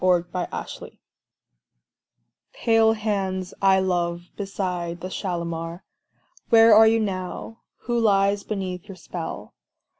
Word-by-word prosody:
Kashmiri 180 0 +1 0.3
Song - - -9 1.6
Pale 225 -1 +3
hands 195 -4 -2
I 190 -1 +5
love 175 -2 -1
beside 180 -4 -3
the 185 - -6
Shalimar, 170 -2 -4 0.7
Where 225 -1 +7
are 220 +1 +8
you 225 +1 +4
now? 195 +2 -4 0.2
Who 240 -1 -1
lies 200 -2 +3
beneath 190 -3 -4
your 195 -3 -10
spell? 170 -1 -7
190 Hz, 110 wpm, -24 LUFS, 175-215 Hz, 1.6 s, are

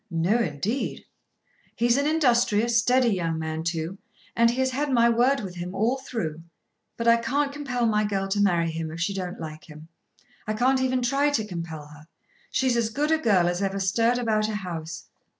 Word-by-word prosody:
"No 175 +7 +1
indeed." 210 - -2 0.7
"He's 235 0 +2
an 280 +2 +1
industrious 235 -7 +2
steady 250 +1 +3
young 165 -3 -1
man 160 0 -3
too, 170 +3 -3 0.4
and 230 0 +4
he 235 - -1
has 260 0 +1
had 285 +2 -1
my 235 -2 +4
word 250 +4 +2
with 190 -3 -6
him 180 +2 -5
all 235 +7 +1
through. 165 -12 -4 0.6
But 230 - -2
I 230 0 +7
can't 280 +4 -1
compel 260 -5 -2
my 215 -1 +2
girl 195 -2 -1
to 205 +1 +1
marry 170 -4 +2
him 160 0 -4
if 165 - -7
she 180 +4 0
don't 185 -2 -5
like 155 -1 -8
him. 155 +1 -12 0.6
I 215 - -1
can't 260 +3 +2
even 255 -1 0
try 275 +4 +2
to 230 -7 0
compel 165 -5 -6
her. 150 +1 -15 0.4
She's 260 -2 +1
as 230 -2 +1
good 295 +7 -1
a 320 - +3
girl 200 - +3
as 175 +2 -1
ever 195 0 -1
stirred 230 +5 +2
about 215 -3 0
a 215 - -3
house." 165 -5 -6
215 Hz, 200 wpm, -25 LUFS, 170-245 Hz, 0.7 s, I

